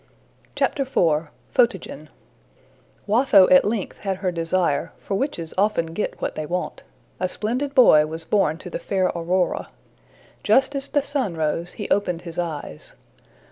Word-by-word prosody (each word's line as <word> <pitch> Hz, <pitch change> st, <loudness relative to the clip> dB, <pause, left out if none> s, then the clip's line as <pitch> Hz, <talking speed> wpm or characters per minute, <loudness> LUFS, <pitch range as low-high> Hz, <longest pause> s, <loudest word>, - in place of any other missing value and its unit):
IV. 275 Hz, -2 st, 0 dB, 0.6 s
Photogen 245 Hz, -2 st, 0 dB, 1.0 s
WATHO 210 Hz, -3 st, +5 dB
at 275 Hz, 0 st, +7 dB
length 210 Hz, -2 st, -3 dB
had 195 Hz, -2 st, -2 dB
her 185 Hz, -1 st, -1 dB
desire, 165 Hz, -3 st, 0 dB
for -, -, -6 dB
witches 195 Hz, -, -2 dB
often 180 Hz, -6 st, +1 dB
get 210 Hz, -, -3 dB
what -, -, -3 dB
they 155 Hz, -1 st, -5 dB
want: 180 Hz, +2 st, -3 dB, 0.4 s
a 185 Hz, -, -1 dB
splendid 255 Hz, +9 st, -2 dB
boy 155 Hz, -, +6 dB
was 160 Hz, +1 st, -5 dB
born 165 Hz, -6 st, +1 dB
to 180 Hz, +1 st, -10 dB
the -, -, -4 dB
fair 185 Hz, +1 st, 0 dB
Aurora. 175 Hz, +2 st, -1 dB, 0.7 s
Just 270 Hz, +1 st, +3 dB
as 275 Hz, 0 st, -2 dB
the 290 Hz, -2 st, 0 dB
sun 265 Hz, -, -2 dB
rose, 160 Hz, +3 st, -2 dB
he 210 Hz, -, -6 dB
opened 180 Hz, -4 st, 0 dB
his 170 Hz, -1 st, -6 dB
eyes. 155 Hz, -, -6 dB
185 Hz, 145 wpm, -23 LUFS, 165-230 Hz, 1.0 s, at